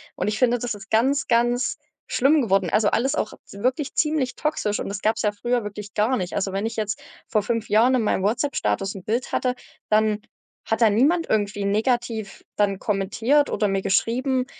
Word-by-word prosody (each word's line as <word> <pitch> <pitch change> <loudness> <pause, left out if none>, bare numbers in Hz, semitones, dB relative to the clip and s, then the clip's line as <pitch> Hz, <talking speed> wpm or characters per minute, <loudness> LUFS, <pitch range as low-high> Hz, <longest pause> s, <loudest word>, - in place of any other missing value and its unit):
Und - - -2
ich 210 +1 -1
finde, 245 -1 +3
das 240 0 -3
ist 205 -1 -11
ganz, 265 +5 +2
ganz 240 +3 +1 0.3
schlimm 285 +4 +3
geworden. 195 -6 +1
Also, 210 -1 +3
alles 265 +4 +1
auch 215 - -2 0.2
wirklich 255 +7 -2
ziemlich 300 -5 0
toxisch 255 -9 -1
und - - -4
das 200 0 -5
gab's 220 +1 +1
ja 210 - +1
früher 240 +3 -1
wirklich 205 0 -7
gar 220 +5 +1
nicht. 180 -2 -4
Also, 195 - -1
wenn 195 +2 -2
ich 225 0 -4
jetzt 210 -2 -2 0.3
vor 215 -2 +1
5 230 +1 -2
Jahren 230 +5 +4
in 255 - +3
meinem 210 -3 0
WhatsApp-Status 200 - 0
'n 190 - -8
Bild 235 +5 -2
hatte, 250 -1 0 0.4
dann 215 0 +2 0.4
hat 225 +1 -1
da 225 - +6
niemand 295 +11 +2
irgendwie 205 -1 0
negativ 220 0 -1
dann 200 -2 +2
kommentiert 220 +9 +1
oder 210 - 0
mir 195 0 0
geschrieben 250 +6 +1
220 Hz, 195 wpm, -23 LUFS, 205-250 Hz, 0.4 s, da